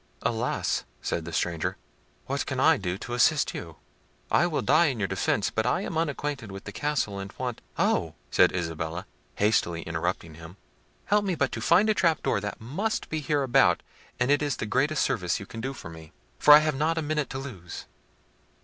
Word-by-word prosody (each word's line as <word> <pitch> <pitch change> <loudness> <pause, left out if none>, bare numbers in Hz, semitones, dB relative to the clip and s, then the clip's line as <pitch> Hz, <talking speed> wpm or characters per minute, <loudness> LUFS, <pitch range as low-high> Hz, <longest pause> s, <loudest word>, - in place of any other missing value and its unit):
"Alas!" 115 +1 0 0.2
said 85 - -2
the 85 - -6
stranger, 85 0 -1 0.5
"what - - -2
can - - -2
I - - +5
do 90 -2 -3
to 120 - -7
assist 145 +5 +3
you? 80 -2 -7 0.6
I 175 - +4
will 160 - -1
die 170 - +5
in 135 -4 -1
your 100 -3 0
defence; 95 +1 0
but 110 +1 0
I 175 - +1
am 180 - -4
unacquainted 145 -7 -2
with 95 0 -8
the 100 - -7
castle, 105 -3 -1
and 95 0 -6
want—" 125 -3 -4 0.2
"Oh!" 80 -1 +1 0.2
said - - +5
Isabella, 80 0 -3 0.3
hastily 85 -5 +1
interrupting 85 0 -3
him; 80 +4 -12 0.5
"help 205 +1 +3
me 190 -3 0
but - - 0
to - - -4
find 200 +5 +4
a 215 - +4
trap 170 -5 +2
door - - +1
that 105 - -5
must 175 - -2
be 155 -1 -2
hereabout, 135 - +3 0.4
and 125 +2 +2
it 145 - +4
is 145 -2 0
the - - -3
greatest 135 +7 +1
service 90 -4 0
you 100 - -8
can 115 +3 -8
do 135 +3 -4
me, 80 -1 -11 0.3
for - - +6
I 150 - +7
have 155 - +1
not 155 +4 0
a 160 - 0
minute 150 -1 -1
to 135 - -5
lose." 105 -12 -8
115 Hz, 200 wpm, -27 LUFS, 90-150 Hz, 0.6 s, I